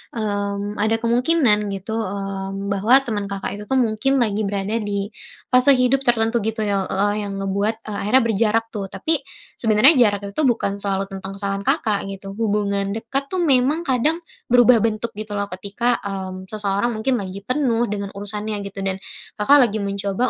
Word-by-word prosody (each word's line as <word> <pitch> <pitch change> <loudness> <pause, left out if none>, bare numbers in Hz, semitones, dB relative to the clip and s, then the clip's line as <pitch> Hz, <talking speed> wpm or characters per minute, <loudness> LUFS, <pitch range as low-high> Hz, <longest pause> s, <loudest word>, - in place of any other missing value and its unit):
mmm, 205 -1 -2
ada 220 +2 +2
kemungkinan 235 -3 +3
gitu, 195 +3 -7
mmm, 195 -1 -4
bahwa, 225 +8 +4
teman 210 -5 -3
Kakak 200 0 -4
itu - - -6
tuh 265 - 0
mungkin 250 +2 +1
lagi 220 -5 +1
berada 200 +3 -1
di 205 -1 -3 0.4
fase 255 +2 +6
hidup 255 +1 +1
tertentu 230 0 +2
gitu 220 +1 -2
ya, 200 -2 0
e - - -3
eee, 205 +2 +2
yang 200 - -5
ngebuat, 200 +3 -2
eee, 210 -1 -5
akhirnya 255 +4 +5
berjarak 225 0 +1
tuh, 200 -3 -4
tapi, 320 - 0 0.4
sebenarnya 225 +7 +5
jarak 205 -4 +4
itu 200 - -9
tuh 310 - +1
bukan 230 -5 0
selalu 195 -1 -1
tentang 190 0 -6
kesalahan 195 0 -3
Kakak, 210 -2 +2
gitu. 195 0 -8
Hubungan 200 -2 0
dekat 265 +5 -3
tuh 370 - -1
memang 280 +3 +2
kadang, 280 +6 +2 0.3
berubah 245 0 +6
bentuk 225 +1 -2
gitu 215 -1 -5
loh, 200 - 0
ketika, 205 +6 -1
mmm, 190 -2 -5
seseorang 205 +1 0
mungkin 235 +4 0
lagi 190 0 -6
penuh 250 -4 +1
dengan 200 -1 -3
urusannya 205 0 -4
gitu. 195 0 -7
Dan, 190 -1 -1 0.4
Kakak 275 +8 +6
lagi 210 - -3
mencoba 200 +4 -1
210 Hz, 175 wpm, -21 LUFS, 200-240 Hz, 0.4 s, fase